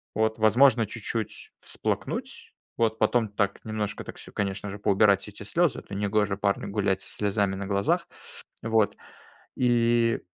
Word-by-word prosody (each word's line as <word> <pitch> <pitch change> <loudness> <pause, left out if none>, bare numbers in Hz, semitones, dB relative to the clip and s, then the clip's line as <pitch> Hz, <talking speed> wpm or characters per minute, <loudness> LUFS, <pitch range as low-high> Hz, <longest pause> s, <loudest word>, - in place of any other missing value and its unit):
Вот. 110 +1 +1
Возможно 115 +2 +5
чуть-чуть 110 0 -5
всплакнуть, - - -4 0.2
вот. 110 -1 +1
Потом 110 0 +2
так 100 -1 -1
немножко, 105 -1 -3
так - - -9
всё, - - -12
конечно 100 0 -2
же, 100 - -6
поубирать 100 -1 +4
все 105 - -9
эти 100 - -10
слезы, 170 +8 +1
это 100 - -9
негоже 105 0 +1
парню 100 0 0
гулять 100 -2 0
со - - -7
слезами 100 -1 0
на 100 +1 -5
глазах. 100 0 +1 0.6
Вот. 110 -2 +2 0.6
И, 120 -1 +2
105 Hz, 150 wpm, -27 LUFS, 100-115 Hz, 0.6 s, Возможно